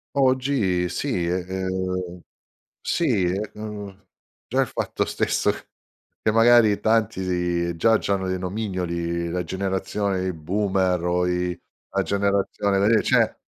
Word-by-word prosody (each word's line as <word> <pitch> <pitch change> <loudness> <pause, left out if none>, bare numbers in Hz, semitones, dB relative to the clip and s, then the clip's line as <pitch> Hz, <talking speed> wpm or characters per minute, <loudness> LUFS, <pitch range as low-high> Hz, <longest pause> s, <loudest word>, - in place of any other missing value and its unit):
Oggi 130 -9 +2
sì 95 -6 -1
ehm, 95 0 -2 0.6
sì, 125 - +1 0.3
ehm, 105 -2 -8 0.4
già - - -1
il - - +1
fatto - - -2
stesso, - - +1 0.7
che - - +3
magari 115 -1 +5
tanti 90 -6 0
già 110 +7 +4
c'hanno 95 -1 -1
dei 95 0 -1
nomignoli, 90 -3 -2
la 90 +1 -1
generazione 95 +2 -2
di 95 0 -1
boomer 95 +2 0
o 90 0 +1
i 90 0 -1 0.3
la 100 0 +1
generazione 100 0 0
dei 110 +1 +4
cioè, - - +2
95 Hz, 115 wpm, -24 LUFS, 90-105 Hz, 0.7 s, magari